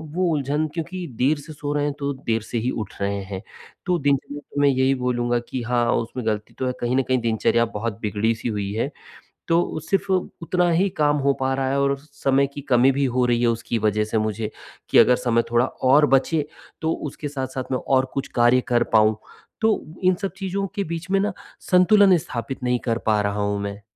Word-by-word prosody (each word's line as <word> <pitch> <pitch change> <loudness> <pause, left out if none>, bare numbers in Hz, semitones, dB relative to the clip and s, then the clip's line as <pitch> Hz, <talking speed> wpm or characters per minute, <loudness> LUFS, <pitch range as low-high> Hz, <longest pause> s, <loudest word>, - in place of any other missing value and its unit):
वो 185 - +1
उलझन 145 +1 0
क्योंकि 175 +2 -4
देर 145 +4 +2
से 155 +2 -10
सो 145 0 -4
रहे 145 0 0
हैं, 145 -1 0
तो 140 0 -1
देर 115 -1 +1
से 120 - -5
ही 120 - -1
उठ 100 - -7
रहे 100 0 -1
हैं, 95 -1 -6 0.4
तो 180 -1 +2
दिनचर्या 145 +1 -2
में 145 - +5
यही 130 0 +2
बोलूँगा 120 -1 0
कि 130 - -3
हाँ, 120 0 +1
उसमें 120 +1 -3
गलती 110 -1 -2
तो 130 - -1
है 125 - -1
कहीं 120 +1 0
न 135 - +3
कहीं 130 0 +2
दिनचर्या 115 +1 +2
बहुत 115 0 -3
बिगड़ी-सी 110 +2 -1
हुई 100 -2 -3
है, 120 +6 -1 0.6
तो 165 -1 +1
सिर्फ़ 195 0 0
उतना 180 -1 0
ही 190 +4 +2
काम 145 0 +3
हो 140 - +5
पा 135 0 0
रहा 135 0 -1
है 140 +1 +1
और 140 0 +2
समय 140 -1 0
की 145 - -6
कमी 125 +1 +5
भी 140 +1 0
हो 125 - +3
रही 120 -1 +1
है 120 - +3
उसकी 115 0 -1
वजह 105 +1 +1
से 110 +1 -2
मुझे, 110 0 -2 0.4
कि - - +4
अगर 125 - +7
समय 115 -2 +1
थोड़ा 120 +1 +4
और 140 +4 +3
बचे, 145 +3 +1 0.4
तो 160 - 0
उसके 150 0 -6
साथ-साथ 130 -2 -5
मैं 130 - +1
और 130 -1 +3
कुछ 135 - -3
कार्य 120 +1 +4
कर 120 -1 +3
पाऊँ। 110 0 +5 0.5
तो 220 -1 +3 0.2
इन 185 0 +5
सब 195 - -2
चीज़ों 195 0 -2
के 200 - 0
बीच 170 +2 -6
में 195 - +3
ना 205 +2 0 0.4
संतुलन 185 0 +6
स्थापित 130 -2 -5
नहीं 125 -1 +1
कर 115 - +1
पा 105 -1 +3
रहा 100 0 -1
हूँ 100 0 -1
मैं। 100 0 -5
130 Hz, 215 wpm, -23 LUFS, 115-150 Hz, 0.6 s, अगर